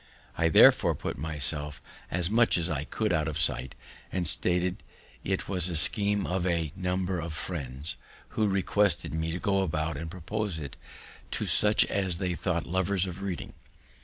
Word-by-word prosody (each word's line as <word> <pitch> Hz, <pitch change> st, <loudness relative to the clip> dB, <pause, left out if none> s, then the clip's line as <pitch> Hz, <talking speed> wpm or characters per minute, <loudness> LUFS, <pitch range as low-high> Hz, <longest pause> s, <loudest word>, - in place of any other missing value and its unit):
I 80 Hz, -, +2 dB
therefore -, -, +6 dB
put -, -, -5 dB
myself 75 Hz, 0 st, -2 dB, 0.3 s
as 85 Hz, 0 st, +1 dB
much 115 Hz, +2 st, +4 dB
as 85 Hz, 0 st, -1 dB
I 75 Hz, -1 st, -2 dB
could 110 Hz, +2 st, -1 dB
out 80 Hz, -2 st, 0 dB
of 75 Hz, -1 st, -3 dB
sight, 70 Hz, -3 st, -1 dB, 0.4 s
and 90 Hz, -2 st, -2 dB
stated 90 Hz, 0 st, +1 dB, 0.4 s
it 95 Hz, 0 st, -2 dB
as 90 Hz, -2 st, +1 dB
a 85 Hz, -, -3 dB
scheme 100 Hz, +5 st, +5 dB
of 90 Hz, -1 st, -1 dB
a 85 Hz, -4 st, -1 dB
number 90 Hz, 0 st, -2 dB
of 80 Hz, -1 st, -5 dB
friends, 75 Hz, -3 st, -5 dB, 0.3 s
who -, -, -4 dB
had 105 Hz, -2 st, +2 dB
requested 95 Hz, -4 st, +1 dB
me 80 Hz, +1 st, -2 dB
to 85 Hz, -, -3 dB
go 100 Hz, -1 st, +1 dB
about 80 Hz, -3 st, -2 dB
and 80 Hz, +2 st, -6 dB
propose 95 Hz, +2 st, -4 dB
it 70 Hz, -4 st, -7 dB, 0.5 s
to -, -, -2 dB
such 105 Hz, 0 st, +4 dB
as 95 Hz, -4 st, -1 dB
they 90 Hz, -1 st, -2 dB
thought 85 Hz, -1 st, -2 dB
lovers 95 Hz, +1 st, 0 dB
of 95 Hz, +1 st, -7 dB
reading. 95 Hz, -3 st, -5 dB
90 Hz, 175 wpm, -28 LUFS, 80-95 Hz, 0.5 s, therefore